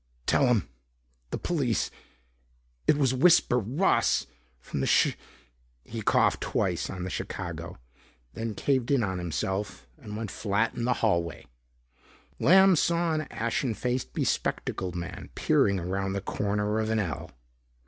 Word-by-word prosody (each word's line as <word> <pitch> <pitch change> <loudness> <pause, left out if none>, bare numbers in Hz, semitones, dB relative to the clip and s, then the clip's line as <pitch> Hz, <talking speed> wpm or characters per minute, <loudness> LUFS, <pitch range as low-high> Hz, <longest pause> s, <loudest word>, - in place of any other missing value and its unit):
"Tell 135 - +3
'em 120 -4 +2 0.6
the - - -3
police 140 -10 0 1.0
it 145 - +5
was 135 -3 +2
was 130 - -3
Whisper 160 -8 +5
Ross 130 - +2 0.3
from - - -4
from - - 0 0.2
Chi - - -12 0.4
" - - -39
He 115 - -3
coughed - - +2
twice - - -1
on 90 -1 -5
the 95 - -4
"Chicago," - - -5 0.6
then 110 - -4
caved 130 -1 0
in 140 -5 +3
on 95 -3 -2
himself 90 -2 -3
and 105 0 -7
went 110 -3 -4
flat 110 +2 0
in 120 - -3
the 125 - +3
hallway. 85 -5 0 0.9
Lamb 190 +1 +6
saw 170 +1 +1
an 155 0 -2
ashen 115 +1 -1
face 125 +2 -1
bespectacled 90 -2 -2
man 85 0 -6
peering 100 -1 +2
around 95 +2 -2
the 100 - -2
corner 105 +2 -1
of 110 0 -1
an 110 - +1
ell. 95 -7 -3
110 Hz, 150 wpm, -28 LUFS, 95-130 Hz, 1.0 s, Lamb